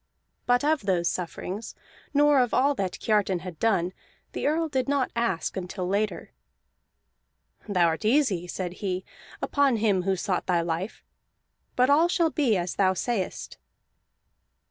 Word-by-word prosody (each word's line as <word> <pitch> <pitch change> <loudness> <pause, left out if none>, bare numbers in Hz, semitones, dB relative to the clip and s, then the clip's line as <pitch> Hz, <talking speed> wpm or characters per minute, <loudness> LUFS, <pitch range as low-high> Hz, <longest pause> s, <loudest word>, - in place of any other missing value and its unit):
But 245 +1 +3
of 300 -9 +1
those 175 -3 +2
sufferings, 185 +4 -4 0.4
nor 290 -1 +4
of 245 -3 +2
all 280 +3 +3
that 195 -8 -3
Kiartan 200 -5 +1
had 175 -3 -8
done, 190 -5 +1 0.4
the - - -2
Earl 320 +2 +1
did 270 -3 -1
not 280 -2 +1
ask 210 -8 -1
until 185 0 -4
later. 205 +3 -1 1.4
"Thou 180 -4 +3
art 165 +4 0
easy," 215 - +2
said 175 0 -4
he, 185 -2 -2 0.4
"upon 280 -4 +2
him 205 -4 +2
who 190 +1 0
sought 185 0 -2
thy 175 -2 +2
life; 170 +5 -4 0.7
but 255 +2 +4
all 315 +4 +5
shall 335 -2 +1
be 255 -10 +2
as 175 0 -3
thou 190 -1 +3
sayest." 210 -3 -3
205 Hz, 145 wpm, -26 LUFS, 180-260 Hz, 1.4 s, all